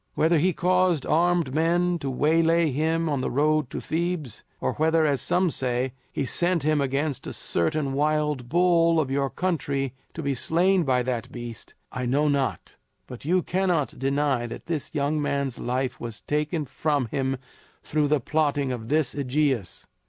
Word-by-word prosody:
Whether 160 Hz, 0 st, +3 dB
he 185 Hz, +5 st, +3 dB
caused 180 Hz, -3 st, +2 dB
armed 170 Hz, -3 st, +2 dB
men 170 Hz, +3 st, +2 dB
to 140 Hz, -2 st, -3 dB
waylay 165 Hz, +4 st, +3 dB
him 160 Hz, +4 st, 0 dB
on 145 Hz, -4 st, 0 dB
the -, -, -1 dB
road 150 Hz, 0 st, +1 dB
to -, -, -5 dB
Thebes, 165 Hz, -, -3 dB, 0.2 s
or -, -, -1 dB
whether 160 Hz, +1 st, +2 dB
as 140 Hz, -3 st, +1 dB
some 180 Hz, -1 st, +1 dB
say 125 Hz, -1 st, -1 dB, 0.2 s
he 140 Hz, -, -2 dB
sent 175 Hz, +3 st, +1 dB
him 155 Hz, -1 st, +2 dB
against 140 Hz, +1 st, -1 dB
a -, -, -5 dB
certain 135 Hz, -, -1 dB
wild 150 Hz, -3 st, 0 dB
bull 170 Hz, -1 st, +4 dB
of 140 Hz, -4 st, -1 dB
your 135 Hz, 0 st, 0 dB
country 140 Hz, -7 st, -2 dB, 0.2 s
to 165 Hz, -, -5 dB
be 140 Hz, 0 st, 0 dB
slain 175 Hz, +7 st, +2 dB
by 125 Hz, -2 st, +2 dB
that 120 Hz, -2 st, -3 dB
beast, 120 Hz, -2 st, -8 dB, 0.2 s
I 125 Hz, -1 st, -3 dB
know 145 Hz, +4 st, +2 dB
not; 140 Hz, -2 st, -1 dB, 0.3 s
but 125 Hz, +1 st, -10 dB
you 180 Hz, +3 st, +2 dB
cannot 175 Hz, -7 st, 0 dB
deny 135 Hz, -2 st, 0 dB
that 115 Hz, -, -8 dB
the 155 Hz, -3 st, -3 dB
young 150 Hz, 0 st, 0 dB
man's 140 Hz, -3 st, -1 dB
life 130 Hz, +1 st, -2 dB
was 115 Hz, -2 st, -7 dB
taken 150 Hz, +1 st, -1 dB
from 140 Hz, +1 st, 0 dB
him 135 Hz, +3 st, -2 dB, 0.5 s
through 150 Hz, -1 st, +1 dB
the 150 Hz, 0 st, +2 dB
plotting 145 Hz, 0 st, 0 dB
of 115 Hz, -3 st, -5 dB
this 150 Hz, -1 st, +1 dB
AEgeus." 135 Hz, -, -1 dB
150 Hz, 170 wpm, -25 LUFS, 135-165 Hz, 0.5 s, bull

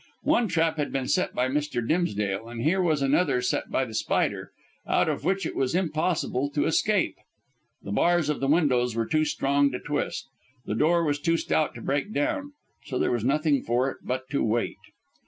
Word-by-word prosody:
One 235 Hz, -, +3 dB
trap 165 Hz, -3 st, +1 dB
had 150 Hz, -, -2 dB
been 135 Hz, -2 st, -2 dB
set 185 Hz, -, 0 dB
by 125 Hz, -, +1 dB
Mr. 135 Hz, -4 st, -2 dB
Dimsdale, 105 Hz, -, 0 dB
and 120 Hz, -1 st, -5 dB
here 180 Hz, +6 st, +2 dB
was 155 Hz, -5 st, +1 dB
another 160 Hz, -, +2 dB
set 380 Hz, -, -1 dB
by -, -, 0 dB
The -, -, -10 dB
Spider, -, -, -1 dB, 0.4 s
out -, -, +2 dB
of -, -, -2 dB
which 195 Hz, +1 st, 0 dB
it -, -, -4 dB
was 135 Hz, +4 st, 0 dB
impossible 155 Hz, -5 st, 0 dB
to 145 Hz, -, +2 dB
escape. 200 Hz, +5 st, +1 dB, 0.7 s
The 100 Hz, -, -6 dB
bars 170 Hz, +8 st, +2 dB
of 150 Hz, -, -1 dB
the 135 Hz, -, -1 dB
windows 130 Hz, -6 st, +2 dB
were 115 Hz, 0 st, 0 dB
too 155 Hz, +5 st, +1 dB
strong 140 Hz, -1 st, +2 dB
to 125 Hz, -, -3 dB
twist, 145 Hz, 0 st, -3 dB, 0.4 s
the -, -, -2 dB
door 165 Hz, +9 st, +3 dB
was 145 Hz, -2 st, 0 dB
too 165 Hz, +3 st, +1 dB
stout 155 Hz, -1 st, 0 dB
to -, -, -8 dB
break 140 Hz, +9 st, -1 dB
down, 285 Hz, -, -1 dB, 0.3 s
so 130 Hz, -, -4 dB
there -, -, +1 dB
was 120 Hz, -3 st, -1 dB
nothing 145 Hz, +2 st, +2 dB
for 125 Hz, +3 st, 0 dB
it -, -, -11 dB
but 130 Hz, +1 st, -3 dB
to 140 Hz, -, +1 dB
wait. 115 Hz, +1 st, 0 dB
145 Hz, 200 wpm, -26 LUFS, 125-165 Hz, 0.7 s, One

